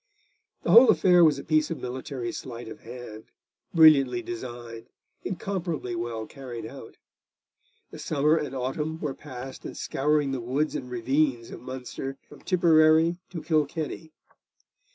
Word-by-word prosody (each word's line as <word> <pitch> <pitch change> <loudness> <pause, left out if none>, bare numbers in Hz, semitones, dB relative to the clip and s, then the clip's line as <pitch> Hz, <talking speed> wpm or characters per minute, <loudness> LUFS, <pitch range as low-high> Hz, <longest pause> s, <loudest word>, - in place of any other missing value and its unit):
The - - 0
whole 245 +3 +9
affair 180 -2 +5
was 155 -4 +5
a 140 - -7
piece 155 -1 +2
of 165 - -4
military 125 -1 -5
sleight 120 -2 -7
of 110 - -9
hand, 115 -2 -10 0.5
brilliantly 135 -7 +6
designed, 120 0 -7 0.4
incomparably 175 -8 -3
well 115 -1 -4
carried 125 -3 -8
out. - - -11 0.9
The - - -10
summer 150 +1 +2
and 145 -4 -3
autumn 150 +5 -3
were 150 -4 -3
passed 130 -2 -9
in - - -7
scouring 145 0 0
the 130 -2 -3
woods 135 +6 -1
and 125 - -5
ravines 125 0 0
of - - -9
Munster 130 +1 -6
from - - -15
Tipperary 165 -1 +4
to 170 -3 -7
Kilkenny. 160 0 -1
135 Hz, 140 wpm, -26 LUFS, 125-155 Hz, 0.9 s, whole